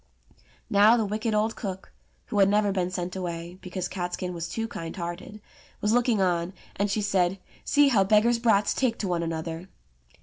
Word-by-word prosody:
Now 210 +4 +5
the 225 - +1
wicked 215 +2 -1
old 215 +1 +1
cook 190 -4 -6 0.3
(who 205 - -2
had 195 0 +6
never 205 0 +2
been 185 -2 -1
sent 180 0 -4
away, 175 -1 -5
because 185 0 -4
Catskin 180 0 -4
was 170 0 -5
too 225 0 -3
kind 165 -7 -6
hearted) 175 +4 -6 0.4
was 210 +1 +1
looking 240 -3 +2
on, 175 -1 0 0.2
and 200 +1 0
she 210 +1 0
said, 190 -2 +1 0.3
"See 290 -1 +4
how 215 -7 +4
beggars* 220 +4 +3
brats 210 -3 +3
take 245 -4 0
to 200 - -3
one 175 -2 0
another 165 +2 -4
195 Hz, 180 wpm, -26 LUFS, 175-215 Hz, 0.4 s, had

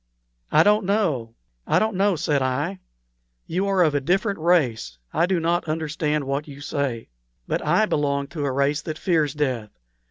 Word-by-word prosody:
"I - - +6
don't 210 +1 +4
know 155 - 0 0.3
I - - +3
don't 220 -2 +1
know," 195 0 +2
said 150 -3 0
I. 145 +9 -1 0.7
"You 185 +4 -1
are 195 -2 +3
of 155 -3 +2
a 145 - +1
different 195 +6 0
race; 130 - +1 0.2
I 165 +3 +2
do 185 -2 +1
not 170 +2 0
understand 155 -1 -1
what 140 +2 -3
you 140 -1 -10
say. 140 -5 -3 0.4
But - - -1
I 215 - +3
belong 140 -6 0
to 155 -2 -4
a 140 - 0
race 140 +2 +1
that 155 0 -5
fears 155 -6 +1
death. 130 -7 -1
150 Hz, 180 wpm, -23 LUFS, 140-180 Hz, 0.7 s, I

